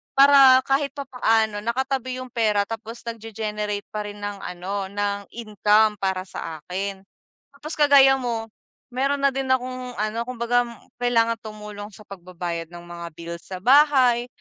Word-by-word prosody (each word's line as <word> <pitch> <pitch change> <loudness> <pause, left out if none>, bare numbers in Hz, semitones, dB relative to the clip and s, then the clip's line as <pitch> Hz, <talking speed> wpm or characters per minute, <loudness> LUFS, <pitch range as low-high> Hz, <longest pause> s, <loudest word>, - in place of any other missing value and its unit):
para 275 -2 +8
kahit 280 +1 +1
papaano 225 -6 0
nakatabi 255 +1 -2
yung 255 - -7
pera 215 -4 +1
tapos 225 +1 -7
nag-ge-generate 210 -2 -4
pa 210 0 -4
rin 205 0 -8
ng 205 -1 -6
ano 190 +2 -4
ng 200 0 -2
income 215 -1 +2
para 190 -1 -1
sa 160 -3 -7
akin. 190 +4 -4 0.6
Tapos 305 +3 -8
kagaya 280 -2 +7
mo, 230 -3 -3 0.4
mayro'n 275 +3 0
na 275 - +4
din 270 0 -3
akong 255 -1 -1
ano 215 +2 -2
kumbaga 245 0 +1 0.4
kailangang 230 -2 +2
tumulong 210 -1 -8
sa 215 - -14
pagbabayad 175 -3 -6
ng 175 0 -11
mga 175 0 -8
bills 170 +1 -8
sa 185 - -6
bahay. 255 -3 +5
225 Hz, 145 wpm, -23 LUFS, 205-255 Hz, 0.6 s, para